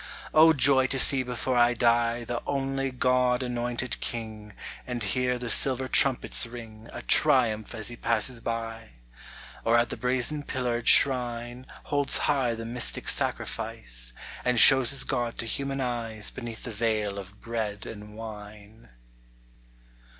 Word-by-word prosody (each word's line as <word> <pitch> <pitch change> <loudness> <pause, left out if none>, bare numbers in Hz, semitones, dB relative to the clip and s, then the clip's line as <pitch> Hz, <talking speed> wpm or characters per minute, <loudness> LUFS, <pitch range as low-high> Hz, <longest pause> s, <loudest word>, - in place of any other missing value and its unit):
O 160 +1 +7
joy 130 -2 +4
to 135 - -1
see 135 +1 +5
before 125 0 -3
I 120 0 +3
die 120 0 +1
The 120 +1 -4
only 135 -1 -2
God 125 0 +1
anointed 120 0 -2
King, 110 -2 -6 0.3
And 120 -2 -4
hear 125 +5 0
the 125 0 -6
silver 130 +2 +1
trumpets 130 -2 +3
ring 115 -1 -11
A - - -8
triumph 120 -8 +3
as 110 0 -3
he 120 - -8
passes 115 +1 -1
by! 115 -1 -5 0.7
Or 115 +1 +3
at 120 0 +1
the - - -5
brazen 130 +4 -1
pillared 125 -4 -3
shrine 120 -1 +3 0.2
Holds 145 -1 -1
high 130 -5 0
the 115 0 -7
mystic 120 +1 -3
sacrifice, - - -1 0.3
And 125 -2 +1
shows 135 -2 +7
his 140 - +3
God 120 -3 -3
to - - -2
human 135 +4 -3
eyes 115 -4 -3
Beneath 120 -3 -8
the 120 - -4
veil 105 -2 -2
of 100 +1 -11
bread 110 -3 -4
and 105 -1 -10
wine. 105 - -11
120 Hz, 145 wpm, -26 LUFS, 115-130 Hz, 0.7 s, O